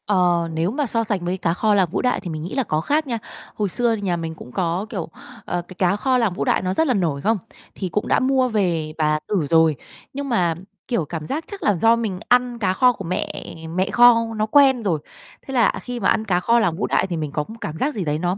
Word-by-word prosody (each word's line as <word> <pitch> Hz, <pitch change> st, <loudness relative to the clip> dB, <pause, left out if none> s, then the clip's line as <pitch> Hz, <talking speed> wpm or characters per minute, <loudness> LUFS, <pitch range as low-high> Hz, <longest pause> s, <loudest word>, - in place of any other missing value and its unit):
Ờ, 175 Hz, -4 st, +2 dB
nếu 165 Hz, +4 st, 0 dB
mà 290 Hz, +4 st, -1 dB
so 230 Hz, -2 st, 0 dB
sánh 205 Hz, -5 st, -2 dB
với 180 Hz, +2 st, -1 dB
cá 165 Hz, -2 st, 0 dB
kho 215 Hz, +4 st, +2 dB
làng 195 Hz, -3 st, +3 dB
Vũ -, -, -1 dB
Đại 250 Hz, -, +1 dB
thì 180 Hz, -, -7 dB
mình 155 Hz, -1 st, -5 dB
nghĩ 175 Hz, -, -6 dB
là 270 Hz, -, +2 dB
có 155 Hz, -8 st, -1 dB
khác 295 Hz, -, 0 dB
nha. 235 Hz, -3 st, -2 dB, 0.4 s
Hồi 205 Hz, -2 st, -1 dB
xưa 235 Hz, +5 st, +2 dB
nhà 200 Hz, -5 st, -1 dB
mình 165 Hz, -1 st, -5 dB
cũng 125 Hz, -, -12 dB
có, 175 Hz, +5 st, -1 dB
kiểu, -, -, -4 dB, 0.4 s
ờ, 175 Hz, -, -2 dB
cái 180 Hz, +2 st, -14 dB
cá 180 Hz, +1 st, +2 dB
kho 255 Hz, +4 st, +1 dB
làng 230 Hz, -6 st, +1 dB
Vũ 140 Hz, -5 st, -2 dB
Đại -, -, +2 dB
nó 185 Hz, 0 st, -1 dB
rất 320 Hz, +11 st, +2 dB
là 255 Hz, -, +3 dB
nổi 160 Hz, -9 st, 0 dB
không? 225 Hz, +5 st, +2 dB, 0.4 s
Thì 185 Hz, -, -4 dB
cũng 210 Hz, +5 st, -2 dB
đã -, -, +3 dB
mua 260 Hz, -1 st, +2 dB
về 170 Hz, -8 st, 0 dB
bà 155 Hz, -1 st, +1 dB
thử 190 Hz, -7 st, +1 dB
rồi, 160 Hz, 0 st, +4 dB, 0.4 s
nhưng 280 Hz, +1 st, -4 dB
mà, 175 Hz, -8 st, +1 dB, 0.3 s
kiểu, 210 Hz, -10 st, 0 dB
cảm 155 Hz, 0 st, -6 dB
giác 305 Hz, +4 st, -2 dB
chắc 400 Hz, -2 st, -8 dB
là 205 Hz, -8 st, +3 dB
do 225 Hz, +7 st, +4 dB
mình 215 Hz, -6 st, -3 dB
ăn 245 Hz, -1 st, +2 dB
cá 185 Hz, -4 st, +1 dB
kho 250 Hz, +6 st, +4 dB
của 220 Hz, -, -8 dB
mẹ 180 Hz, +2 st, -3 dB, 0.3 s
mẹ 185 Hz, +1 st, +1 dB
kho 230 Hz, -2 st, +5 dB
nó 215 Hz, 0 st, 0 dB
quen 265 Hz, 0 st, +4 dB
rồi. 175 Hz, -7 st, 0 dB, 0.5 s
Thế 270 Hz, -, -5 dB
là 240 Hz, -3 st, +2 dB
khi 245 Hz, -1 st, -5 dB
mà 200 Hz, -, +2 dB
ăn 220 Hz, -, +1 dB
cá 180 Hz, -4 st, +1 dB
kho 235 Hz, +6 st, +3 dB
làng 175 Hz, -8 st, +1 dB
Vũ -, -, -1 dB
Đại -, -, +1 dB
thì 175 Hz, -3 st, -3 dB
mình 155 Hz, -2 st, -3 dB
có 150 Hz, +1 st, -1 dB
một 225 Hz, -, -9 dB
cảm 155 Hz, -, -5 dB
giác 290 Hz, -, 0 dB
gì 205 Hz, -, -3 dB
đấy 150 Hz, 0 st, -1 dB
nó 180 Hz, +2 st, -1 dB
195 Hz, 270 wpm, -22 LUFS, 170-235 Hz, 0.5 s, kho